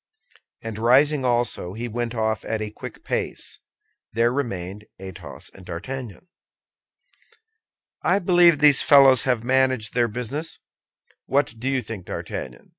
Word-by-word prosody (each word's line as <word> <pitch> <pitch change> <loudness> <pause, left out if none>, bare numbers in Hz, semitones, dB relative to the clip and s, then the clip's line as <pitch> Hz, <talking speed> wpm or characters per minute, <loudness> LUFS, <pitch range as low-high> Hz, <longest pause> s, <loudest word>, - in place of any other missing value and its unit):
And 110 -1 -6
rising 135 +5 +3
also, 120 -7 -1
he 115 +3 -5
went 120 +1 -4
off 110 -1 -1
at 110 - -3
a 105 -1 -5
quick - - -10
pace. - - -3 0.5
There 115 +2 +2
remained 105 -6 -4
Athos 95 -2 -10
and 95 - -14
D'Artagnan. 115 - -7 1.8
"I 180 - +2
believe 175 -4 +4
these 145 -2 +6
fellows 135 -3 +6
have 125 -4 0
managed 130 -3 +1
their 120 -1 +2
business. 125 +8 -5 0.7
What 140 -2 +1
do 130 +4 -2
you 135 -2 -1
think, 105 -4 -8
D'Artagnan?" 60 -1 -7
120 Hz, 130 wpm, -23 LUFS, 110-135 Hz, 1.8 s, these